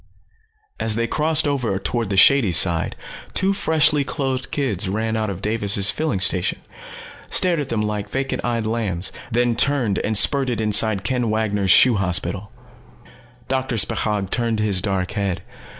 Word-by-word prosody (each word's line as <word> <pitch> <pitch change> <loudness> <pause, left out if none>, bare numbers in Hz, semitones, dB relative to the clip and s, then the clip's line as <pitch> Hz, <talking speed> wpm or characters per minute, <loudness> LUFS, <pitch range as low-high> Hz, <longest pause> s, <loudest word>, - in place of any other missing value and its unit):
As 110 -1 0
they 115 +1 0
crossed 155 +4 +1
over 125 -9 -1
toward 115 +2 -2
the 100 - -2
shady 125 -2 +5
side, 85 -1 +1 0.4
two 195 +1 +1
freshly 155 -5 +2
clothed 135 -3 -3
kids 105 -9 -1
ran 110 +3 -2
out 110 -1 -1
of 95 0 -7
Davis' 100 -3 +2
Filling 155 - -2
Station, 90 -1 +1 0.7
stared 175 -3 +2
at 140 -3 -4
them 110 -2 -1
like 105 -1 -3
vacant 135 +4 -3
eyed 115 -2 -2
lambs, 105 -5 -2 0.2
then 120 0 +1
turned 125 -5 +1
and 110 -1 0
spurted 130 -2 +2
inside 105 -2 +2
Ken 125 +3 -1
Wanger's 105 -3 -1
Shoe 120 +5 +6
Hospital. 90 +1 -2 1.0
Doctor 130 -2 -2
Spechaug 105 -2 -1
turned 115 -2 -1
his 100 -4 +1
dark 95 -2 -2
head. 100 -3 -3
110 Hz, 150 wpm, -21 LUFS, 100-130 Hz, 1.0 s, Shoe